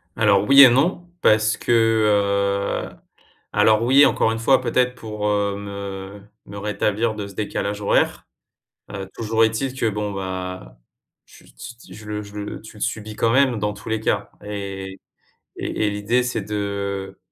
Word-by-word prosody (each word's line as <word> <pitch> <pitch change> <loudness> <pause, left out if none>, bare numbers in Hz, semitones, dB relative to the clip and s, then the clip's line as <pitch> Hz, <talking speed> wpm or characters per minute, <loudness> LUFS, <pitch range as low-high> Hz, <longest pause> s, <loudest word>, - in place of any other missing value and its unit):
Alors 105 -3 +3
oui 140 0 +9
et 130 - +9
non 150 +9 +1 0.2
parce 110 0 +3
que, - - -3 1.2
heu, - - -17 0.6
alors 110 0 +4
oui, 135 +4 +6
encore 110 - +2
une 115 - -3
fois 130 +4 +3
peut-être 125 0 +1
pour, 105 -3 -5
heu, 100 -1 0
me 100 0 -7 0.3
me 100 0 -9
rétablir 105 +2 -1
de 105 -1 -5
ce 100 - -12
décalage 105 0 -3
horaire. 100 - +1 0.7
Heu, 95 -1 -6
toujours 115 0 +1
est-il 115 +4 -2
que 115 - +2
bon, 105 0 -3
bah, 90 -9 -6 0.5
j - - -18
ts 120 - -11
ts - - -12
je 110 - -12
le 105 0 -4
je 100 0 -13
le 105 0 -6
tu 110 0 -13
le - - -13
subis 110 0 -3
quand 115 - +1
même 130 -1 +3
dans 105 0 -1
tous 105 - -10
les 110 0 0
cas 110 - -1
et 95 -2 -6 0.6
et 110 - -2
et - - +1
l'idée 105 +5 0
c'est 125 -3 -2
de 100 -1 -4
105 Hz, 175 wpm, -22 LUFS, 100-115 Hz, 1.2 s, oui